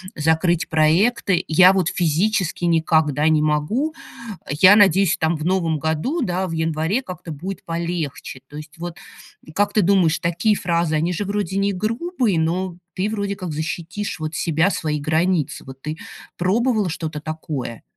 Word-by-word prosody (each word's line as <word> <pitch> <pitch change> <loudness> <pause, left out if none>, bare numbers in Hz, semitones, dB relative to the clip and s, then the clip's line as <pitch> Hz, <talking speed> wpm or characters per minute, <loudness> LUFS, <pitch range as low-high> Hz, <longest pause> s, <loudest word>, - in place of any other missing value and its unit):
закрыть 160 +2 +1
проекты. 180 +4 +2
Я 180 +4 +6
вот 185 -3 +1
физически 180 +2 0
никогда 160 -3 +2
не 155 -1 +3
могу. 155 - 0 0.6
Я 185 +8 +6
надеюсь, 195 -3 +4
там, 160 +1 +1
в 155 - -5
новом 170 -4 +1
году, 160 - -1
да, 185 -4 -1
в - - -6
январе 160 +7 0
как-то 180 -7 -8
будет 180 +6 -6
полегче". 165 -6 -4
То 145 - -10
есть, 155 +2 -11
вот, 170 0 -6 0.6
как 205 0 +1
ты 215 - +4
думаешь, 180 -3 +3
такие 180 +5 +1
фразы, 170 -3 0
они 165 +4 0
же 205 +4 -3
вроде 200 -2 -2
не 200 0 +1
грубые, 230 - -1
но 175 +2 -1 0.2
ты 195 +3 -1
вроде 200 -2 -2
как 185 -3 -6
защитишь 170 +6 -4
вот 155 0 -4
себя, 165 +3 +1
свои 150 -4 -2
границы. 160 +1 0
Вот 135 0 -11
ты 155 +1 -5 0.4
пробовала 215 +2 +1
что-то 160 -2 -4
такое? 150 -6 -5
170 Hz, 155 wpm, -21 LUFS, 155-195 Hz, 0.6 s, Я